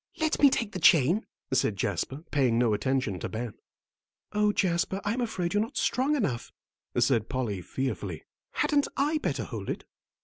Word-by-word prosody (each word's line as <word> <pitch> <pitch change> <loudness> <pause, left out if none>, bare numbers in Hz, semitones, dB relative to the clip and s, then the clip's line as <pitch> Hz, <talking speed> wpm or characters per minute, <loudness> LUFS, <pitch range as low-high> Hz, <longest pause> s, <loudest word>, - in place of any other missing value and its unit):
"Let 315 -1 +1
me 285 - +9
take 230 -5 -1
the 185 - -4
chain," 165 - +5 0.3
said 120 -5 +2
Jasper, 100 - -2
paying 130 -6 +3
no 120 -2 +3
attention 130 -4 0
to - - -4
Ben. 115 0 -4 0.8
"Oh, 210 0 +3
Jasper, 185 0 0
I'm 230 +5 0
afraid 185 -7 -2
you're 205 - +3
not 230 +6 -4
strong 270 +5 +2
enough," 145 - -2 0.5
said 120 -2 +2
Polly, 120 -8 -2
fearfully. 130 +8 -3 0.3
"Hadn't 290 -1 +2
I 300 +3 +2
better - - -1
hold - - -6
it?" - - -3
160 Hz, 165 wpm, -28 LUFS, -, 0.8 s, me